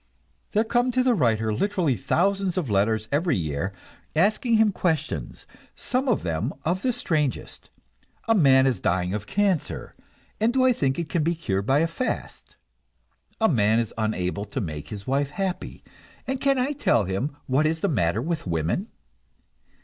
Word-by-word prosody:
There 215 +1 +3
come 240 +2 +1
to 255 +1 +2
the 255 -1 +3
writer 110 - +1
literally 180 - +1
thousands 190 - 0
of 150 - -1
letters 105 +2 +1
every 160 - +1
year, 80 +2 -2 0.4
asking 215 +7 +2
him 220 -1 +4
questions, 160 -5 -2 0.3
some 255 +2 -2
of 240 - +1
them 85 - -2
of 180 +4 0
the 255 - +1
strangest. 155 - -2 0.6
A 225 - +5
man 135 -9 +5
is 130 -3 0
dying 90 +1 0
of 105 0 -4
cancer, 195 -5 -1 0.4
and 220 +2 +3
do 260 0 +3
I 255 - +5
think 135 - 0
it 170 -2 -2
can 165 - 0
be 170 +3 +1
cured 100 -11 -2
by 135 - +4
a 165 - +2
fast? 210 +10 -5 0.8
A 220 - +4
man 110 - +3
is 115 -2 -1
unable 100 -3 -2
to 100 - -4
make 75 -4 -5
his 100 +4 -7
wife 140 +1 0
happy, 185 +4 -4 0.4
and 265 -1 -3
can 275 -1 +3
I 260 +3 0
tell 120 - +2
him 110 +11 -3
what 140 +4 +2
is 160 +1 -1
the - - +2
matter 100 - +1
with 165 - -3
women? 80 -1 -1
150 Hz, 170 wpm, -25 LUFS, -, 0.8 s, A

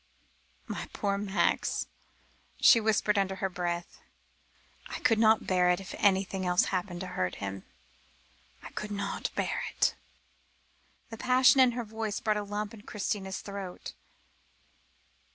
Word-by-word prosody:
"My - - -5
poor 200 -2 0
Max," 200 0 0 0.7
she 230 - +7
whispered 210 -1 +2
under 195 -1 0
her 190 0 -2
breath. 175 -1 -4 0.9
"I - - -5
could 225 -3 +3
not 220 -1 +4
bear 180 -1 +3
it 180 +1 +2
if 195 - -8
anything 190 -1 +2
else 180 0 +3
happened 180 -1 -2
to - - -3
hurt 90 - -2
him; 100 -1 -6 1.0
I - - -9
could 210 - -5
not 200 -1 -3
bear - - -1
it." - - +3 1.2
The 225 - -6
passion 255 +1 +5
in 250 -2 +5
her 240 0 -3
voice 220 -1 -3
brought 215 -1 +1
a - - -1
lump 205 +1 -4
into 215 -2 -13
Christina's 195 -2 -3
throat. 200 -3 -7
200 Hz, 140 wpm, -29 LUFS, 185-215 Hz, 1.2 s, she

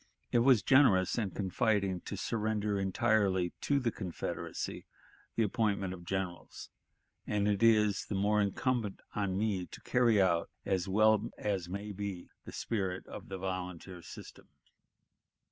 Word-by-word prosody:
It 120 - +4
was 125 -2 +5
generous 105 -10 +5
and 100 -4 -1
confiding 95 0 0
to - - -5
surrender 105 -2 -1
entirely 95 -2 +1
to 140 -1 +2
the 120 -3 0
Confederacy 90 -6 -5 0.5
the 115 - +2
appointment 100 -3 0
of 85 -2 -10
generals, 95 -1 -5 0.6
and 105 -1 +1
it 100 -1 +1
is 105 -3 +4
the 105 - -3
more 105 +2 +2
incumbent 105 +1 -1
on 100 -2 -1
me 100 -4 -1
to - - -11
carry 120 -4 +3
out 85 -3 +2 0.2
as 95 -1 0
well 110 +2 +3
as 95 -4 -2
may 100 +3 -5
be 100 -3 -6
the - - -8
spirit 95 -5 -2
of - - -9
the 95 - -4
volunteer 90 -1 -5
system." - - -11
100 Hz, 145 wpm, -32 LUFS, 95-110 Hz, 0.6 s, was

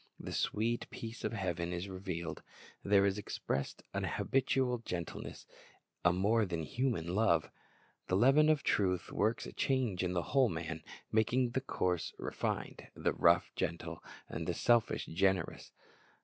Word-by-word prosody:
The - - -6
sweet 115 +3 0
peace 115 +1 -7
of - - 0
heaven 90 -4 -2
is 90 +2 -3
revealed. 90 -4 -5 0.4
There 100 -1 +5
is 100 +1 +1
expressed 70 -8 -3
a - - -1
habitual 130 -1 +1
gentleness, 90 -7 -5 0.6
a 90 - +6
more 105 +6 +3
than 85 -3 -2
human 105 - -1
love. 110 +3 +3 0.6
The 90 - +1
leaven 135 +9 +6
of 155 -2 +3
truth 90 -3 +1
works 110 +3 +1
a - - -8
change 125 -9 0
in 90 0 0
the 85 -1 0
whole 135 -4 +5
man, 80 -1 -4 0.3
making 120 +3 +2
the 130 - 0
coarse 90 -9 -1
refined, - - -3
the - - 0
rough - - +4
gentle, 85 0 -3 0.2
the - - -3
selfish 120 -2 +3
generous. 95 0 0
100 Hz, 145 wpm, -34 LUFS, 85-120 Hz, 0.6 s, a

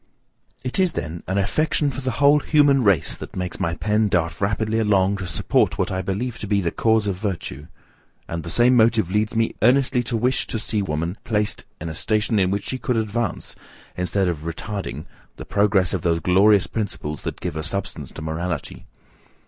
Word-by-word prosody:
It 130 +8 -3
is, 185 -2 +3
then, 80 +1 -4
an 95 - -1
affection 145 +8 +1
for 135 - -6
the 130 - -2
whole 145 +1 +5
human 145 -3 +4
race 100 -8 +2
that - - -9
makes 90 -1 -4
my 85 0 -1
pen 105 +3 +1
dart 85 -3 -1
rapidly 110 +3 0
along 100 -2 +2
to 95 -2 -5
support 85 - +1
what - - -1
I 95 0 -1
believe 110 +6 -3
to 105 - -5
be 100 0 +2
the 85 -4 -1
cause 110 -1 +2
of 100 -3 -1
virtue: 90 -7 -4 0.6
and 85 0 -4
the 85 - -7
same 120 +7 +4
motive 110 -5 +3
leads 105 +3 0
me 115 0 +1
earnestly 125 +1 +3
to 120 -1 -1
wish 125 +3 +1
to - - -2
see 110 -1 -1
woman 85 +1 -3
placed 105 -2 -1
in 85 - -5
a 80 - -4
station 105 +5 +1
in 95 -1 +2
which 100 +1 -2
she 130 - -3
would 125 -3 +2
advance, 110 -2 -2 0.4
instead 90 +2 0
of 85 -4 -1
retarding, 85 -1 -5 0.3
the - - -9
progress 100 -3 +2
of 95 - -1
those 85 -1 +1
glorious 95 +3 +4
principles 95 -9 -4
that - - -5
give - - -4
a 80 - -2
substance 80 -4 -4
to 80 - -7
morality. 80 +1 -4
100 Hz, 195 wpm, -22 LUFS, 90-115 Hz, 0.6 s, whole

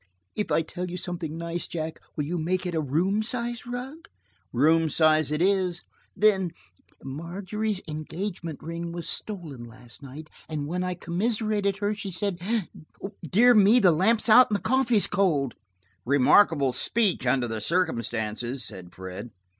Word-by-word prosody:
"If 210 - -2
I 165 - +3
tell 180 +3 -6
you 180 - -5
something 170 -3 -4
nice, 170 +1 -3
Jack, 160 -1 -5 0.2
will 150 - -1
you 170 +3 -2
make 180 +3 -1
it 180 - -3
a 160 - 0
room 175 +9 +1
size 240 +1 -3
rug?" 265 +7 -7 0.4
"Room 160 +5 +3
size 155 -1 +3
it 150 +3 0
is." 185 -3 +1 0.3
"Then–Margery's 190 0 -2
engagement 160 +1 -5
ring 170 +1 -5
was 170 -1 -4
stolen 165 - -2
last 120 +3 -13
night 145 +3 -10 0.2
and 150 -2 -3
when 180 +4 -2
I 180 0 -2
commiserated 205 +3 -1
her 205 +1 -1
she 205 -1 -6
said–dear 195 +2 0
me, 215 +2 +6
the 185 -6 +5
lamp's 215 +9 +2
out 245 +3 +7
and 210 - +1
the - - -14
coffee 260 -3 +2
is 205 - +4
cold!" 155 - +1 0.5
"Remarkable 140 - +4
speech, 190 - +1
under 125 -1 +2
the 110 -1 -4
circumstances," 120 - -1
said 90 -2 -9
Fred. 95 +5 -7
175 Hz, 150 wpm, -26 LUFS, 150-205 Hz, 0.5 s, out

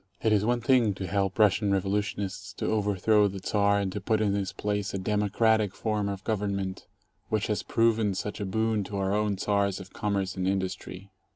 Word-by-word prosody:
It 110 - +3
is 105 -1 +3
one 120 +2 +1
thing 120 -4 +3
to 95 - -5
help 95 0 -1
Russian 105 -1 +3
revolutionists 100 0 -2
to - - -4
overthrow 105 0 +2
the 100 0 -5
Czar 100 +1 +2
and 100 -2 -1
to 105 - -5
put 110 +3 +1
in 105 -2 +1
his 100 -2 -1
place 100 0 -2
a - - 0
"democratic" 105 +1 +1
form 105 -2 -1
of 100 0 -5
government 100 -3 -2 0.4
which 110 -2 0
has 105 - -1
proven 115 -3 +1
such 105 +3 -4
a 100 - -2
boon 110 +1 0
to 100 +1 -5
our 95 0 0
own 105 -1 0
Czars 100 -1 0
of 95 -1 -11
commerce 100 -2 -1
and 95 0 -1
industry. 95 0 -3
100 Hz, 195 wpm, -28 LUFS, 95-105 Hz, 0.4 s, It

